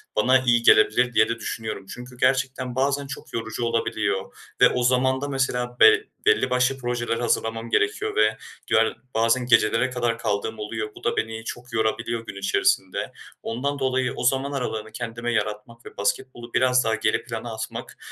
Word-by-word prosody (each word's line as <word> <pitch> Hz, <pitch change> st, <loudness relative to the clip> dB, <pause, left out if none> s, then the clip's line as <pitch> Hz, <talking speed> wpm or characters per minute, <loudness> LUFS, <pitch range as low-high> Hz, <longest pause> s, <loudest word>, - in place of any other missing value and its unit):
bana 130 Hz, +5 st, +4 dB
iyi 120 Hz, -2 st, +2 dB
gelebilir 120 Hz, +3 st, +5 dB
diye 110 Hz, 0 st, +4 dB
de 115 Hz, -, -2 dB
düşünüyorum. 110 Hz, -4 st, -5 dB
Çünkü 125 Hz, 0 st, -11 dB
gerçekten 130 Hz, -1 st, 0 dB
bazen 140 Hz, +1 st, 0 dB
çok 135 Hz, -, -9 dB
yorucu 115 Hz, +1 st, -3 dB
olabiliyor 110 Hz, -4 st, -1 dB, 0.3 s
ve -, -, +8 dB
o 125 Hz, -, -1 dB
zaman 130 Hz, +1 st, +2 dB
da 145 Hz, -, -2 dB
mesela 125 Hz, -3 st, -2 dB
be 435 Hz, 0 st, +7 dB, 0.2 s
belli 440 Hz, 0 st, +3 dB
başlı 125 Hz, +1 st, +1 dB
projeler 120 Hz, -2 st, -2 dB
hazırlamam 115 Hz, -1 st, -1 dB
gerekiyor 105 Hz, -2 st, 0 dB
ve 110 Hz, 0 st, +3 dB, 0.3 s
yani, 110 Hz, 0 st, +3 dB, 0.2 s
bazen 115 Hz, +3 st, +2 dB
gecelere 115 Hz, +1 st, +3 dB
kadar 120 Hz, -2 st, -1 dB
kaldığım 110 Hz, 0 st, -2 dB
oluyor. 110 Hz, 0 st, -4 dB
Bu -, -, -14 dB
da -, -, 0 dB
beni 110 Hz, 0 st, -2 dB
çok 120 Hz, +1 st, -8 dB
yorabiliyor 115 Hz, +1 st, -1 dB
gün 100 Hz, -2 st, -8 dB
içerisinde. 95 Hz, -1 st, 0 dB, 0.3 s
Ondan 140 Hz, +5 st, -2 dB
dolayı 130 Hz, -1 st, 0 dB
o -, -, -5 dB
zaman 135 Hz, +2 st, +1 dB
aralığını 110 Hz, -5 st, -4 dB
kendime 115 Hz, +1 st, -4 dB
yaratmak 105 Hz, +2 st, -3 dB
ve -, -, -12 dB
basketbolu 120 Hz, +3 st, -3 dB
biraz 125 Hz, 0 st, +3 dB
daha 110 Hz, 0 st, +1 dB
geri 110 Hz, -, 0 dB
plana 115 Hz, -1 st, -6 dB
atmak 110 Hz, -, -6 dB
120 Hz, 170 wpm, -24 LUFS, 110-130 Hz, 0.3 s, ve